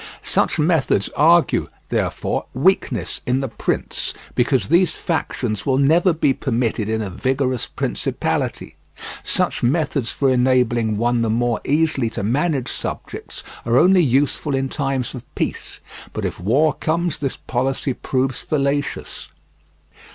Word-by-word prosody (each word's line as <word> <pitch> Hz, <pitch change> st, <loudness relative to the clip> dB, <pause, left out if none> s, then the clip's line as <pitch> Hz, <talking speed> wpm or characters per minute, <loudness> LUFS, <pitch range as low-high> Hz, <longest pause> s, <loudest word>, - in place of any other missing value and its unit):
Such -, -, +1 dB
methods 150 Hz, -, +2 dB
argue, 165 Hz, +3 st, +4 dB, 0.2 s
therefore, -, -, -1 dB
weakness -, -, +1 dB
in 125 Hz, +1 st, +2 dB
the 135 Hz, -, -2 dB
prince, 110 Hz, -, -2 dB, 0.2 s
because 120 Hz, -3 st, +1 dB
these 170 Hz, 0 st, +4 dB
factions 125 Hz, -, -2 dB
will 130 Hz, -1 st, +1 dB
never 160 Hz, +6 st, +4 dB
be 155 Hz, -4 st, +2 dB
permitted 115 Hz, -5 st, -1 dB
in 110 Hz, 0 st, 0 dB
a 100 Hz, -, -4 dB
vigorous 130 Hz, +3 st, -1 dB
principality; -, -, -2 dB, 0.4 s
such -, -, 0 dB
methods 140 Hz, -1 st, 0 dB
for 135 Hz, -2 st, +1 dB
enabling 125 Hz, -4 st, +2 dB
one 120 Hz, +1 st, +1 dB
the 115 Hz, -, +1 dB
more 120 Hz, +1 st, 0 dB
easily 150 Hz, -5 st, +1 dB
to -, -, -1 dB
manage 135 Hz, +4 st, 0 dB
subjects -, -, -6 dB, 0.2 s
are 120 Hz, +1 st, +2 dB
only 185 Hz, +5 st, +6 dB
useful 140 Hz, +1 st, +1 dB
in 135 Hz, 0 st, -1 dB
times 135 Hz, -3 st, -2 dB
of 125 Hz, -3 st, -7 dB
peace, -, -, -4 dB, 0.3 s
but -, -, -3 dB
if -, -, -4 dB
war 135 Hz, -, +2 dB
comes 170 Hz, 0 st, -1 dB
this 135 Hz, -3 st, -2 dB
policy 130 Hz, +1 st, -1 dB
proves 130 Hz, +1 st, -1 dB
fallacious. 145 Hz, -1 st, -2 dB
135 Hz, 135 wpm, -21 LUFS, 120-150 Hz, 0.4 s, only